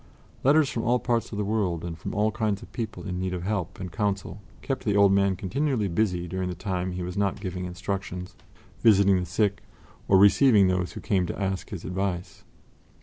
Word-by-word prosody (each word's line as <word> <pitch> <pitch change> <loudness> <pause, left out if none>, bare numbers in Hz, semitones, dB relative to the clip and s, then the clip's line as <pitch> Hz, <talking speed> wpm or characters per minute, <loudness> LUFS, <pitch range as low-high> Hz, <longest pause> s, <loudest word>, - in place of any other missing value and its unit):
Letters 145 +2 +5
from 115 - -2
all 120 +2 +2
parts 120 -2 -1
of 105 - -5
the 105 - -1
world 100 -6 -1
and 85 -1 -4
from 85 - -6
all 105 +1 +2
kinds 110 -3 -1
of - - -14
people 115 -3 -5
in 90 -1 -3
need 90 0 -2
of 85 - -5
help 100 -3 -3
and 90 -2 -6
counsel 100 0 -2 0.2
kept 135 - -3
the 105 -4 +1
old 100 -1 +6
man 100 -1 +3
continually 125 +4 -1
busy 90 -1 0
during 95 +1 -3
the 90 - -4
time 95 -3 -3
he 90 0 -4
was 90 +1 -5
not 100 -1 0
giving 90 -2 -4
instructions, 90 0 -5 0.4
visiting 100 -4 +5
the 90 - -4
sick, 100 +3 0 0.5
or 95 - +5
receiving 100 0 +6
those 90 -1 -1
who - - -7
came 95 -4 +1
to - - -5
ask 95 -1 -2
his 95 -5 -7
advice. 90 -1 -3
95 Hz, 205 wpm, -26 LUFS, 90-105 Hz, 0.5 s, old